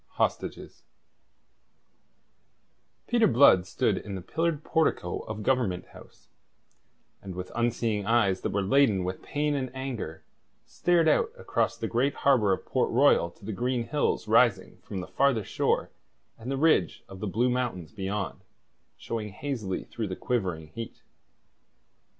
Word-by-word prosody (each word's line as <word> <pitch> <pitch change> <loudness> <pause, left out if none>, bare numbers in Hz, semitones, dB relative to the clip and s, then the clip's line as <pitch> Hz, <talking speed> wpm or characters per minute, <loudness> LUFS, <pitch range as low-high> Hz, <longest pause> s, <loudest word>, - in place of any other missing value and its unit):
HOSTAGES - - -2 2.2
Peter 235 -2 +3
Blood 115 -7 +6
stood - - 0
in 100 - -7
the 95 - -6
pillared 160 - -1
portico 160 - 0
of 110 -1 -6
Government 110 -8 0
House, - - -16 0.9
and 95 -2 -8
with 90 0 -6
unseeing 115 -3 0
eyes 100 -5 +3
that - - -1
were 100 0 0
laden 105 -2 +3
with 90 +1 -4
pain 150 0 -1
and 135 -3 -2
anger, 120 -12 -5 0.4
stared 175 -2 +2
out 455 - +3
across - - -1
the - - -3
great 130 +5 +1
harbour 125 -8 +3
of 95 - -1
Port - - 0
Royal 85 - +4
to 90 - -17
the 110 - -3
green 120 +2 -1
hills 150 -6 0
rising 110 -3 +3
from 95 -3 -5
the 90 - -8
farther 120 +3 +2
shore - - 0 0.4
and 115 +3 -8
the 135 - -1
ridge 140 - +2
of 95 - -11
the 105 - -3
Blue 120 +6 +1
Mountains 120 -10 -2
beyond, 100 -1 -4 0.6
showing 110 -2 -4
hazily 110 -4 -4
through 110 -2 -5
the 95 - -4
quivering 90 -11 -2
heat. 115 +8 -8
115 Hz, 145 wpm, -28 LUFS, 95-135 Hz, 2.2 s, Blood